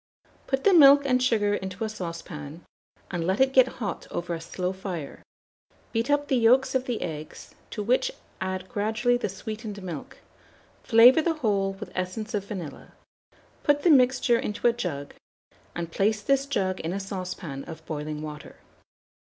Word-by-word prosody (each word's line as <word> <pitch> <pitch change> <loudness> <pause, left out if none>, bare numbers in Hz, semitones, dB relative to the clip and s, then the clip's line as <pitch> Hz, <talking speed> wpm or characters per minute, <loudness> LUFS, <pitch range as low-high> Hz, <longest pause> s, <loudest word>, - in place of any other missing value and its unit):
Put 270 0 -1
the 400 - +5
milk 285 -3 +8
and 255 -2 +2
sugar 215 -5 +2
into 190 0 -4
a - - 0
saucepan, 165 -5 -7 0.5
and 175 -2 -2
let 190 +1 +1
it 265 0 +3
get 260 -1 +6
hot 210 -5 -4
over 175 0 -3
a 165 - -4
slow 180 +2 -3
fire; 185 -6 -6 0.7
beat 230 +3 -1
up 290 0 +2
the 265 - +2
yolks 245 +3 +4
of 260 -1 0
the 245 -3 -2
eggs, 155 -2 -7 0.2
to 210 - -4
which 255 - +2 0.3
add 185 0 -3
gradually 220 +5 +1
the 245 - -2
sweetened 210 +1 -7
milk; 170 -6 -7 0.6
flavour 245 +6 +7
the 325 0 0
whole 200 -8 0
with 195 - -9
essence 185 +6 -4
of 200 -2 -1
vanilla, 180 -8 -8 0.7
put 290 0 +2
the 345 - +5
mixture 250 -3 +4
into 210 - -4
a 235 - +4
jug, 160 -12 -4 0.6
and 170 -1 -4
place 210 +3 +1
this 275 +2 +2
jug 190 -8 -1
in 165 +2 -3
a 195 - -2
saucepan 185 -7 -5
of 160 -1 -10
boiling 150 -1 -4
water. 150 -1 -8
205 Hz, 170 wpm, -26 LUFS, 180-250 Hz, 0.7 s, milk